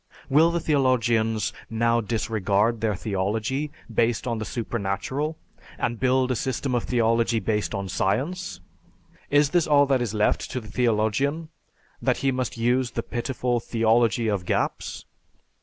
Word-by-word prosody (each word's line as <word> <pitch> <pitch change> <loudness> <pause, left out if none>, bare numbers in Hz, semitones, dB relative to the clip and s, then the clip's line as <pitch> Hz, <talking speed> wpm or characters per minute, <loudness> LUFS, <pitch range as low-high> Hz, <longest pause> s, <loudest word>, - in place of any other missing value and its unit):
_ - - -27
Will 155 +5 +5
the 170 0 0
theologians 120 -7 +1 0.2
now 115 +1 +2
discard 110 0 0
their 110 -2 +1
theology 110 +9 -2 0.2
based 115 0 +1
on 115 -3 -2
the 110 - -3
supernatural, 120 - -3 0.4
and 115 -1 -2
build 130 0 +2
a - - +1
system 130 +2 -2
of 120 - 0
theology 115 -1 +2
based 110 -1 -1
on 100 -1 -3
science? 110 - -2 0.7
Is 145 0 +3
this 175 -2 +2
all 145 -1 +5
that 135 -2 +2
is 110 -3 -2
left 105 - +1
to 130 - -3
the 110 -3 -11
theologian: 125 +8 0 0.5
that - - +1
he 135 - +4
must 125 -5 -3
use 120 +2 +1
the 115 0 -4
pitiful 120 0 -1
"Theology 115 0 +2
of 100 -4 0
Gaps"? - - -2
115 Hz, 150 wpm, -25 LUFS, 110-130 Hz, 0.7 s, Will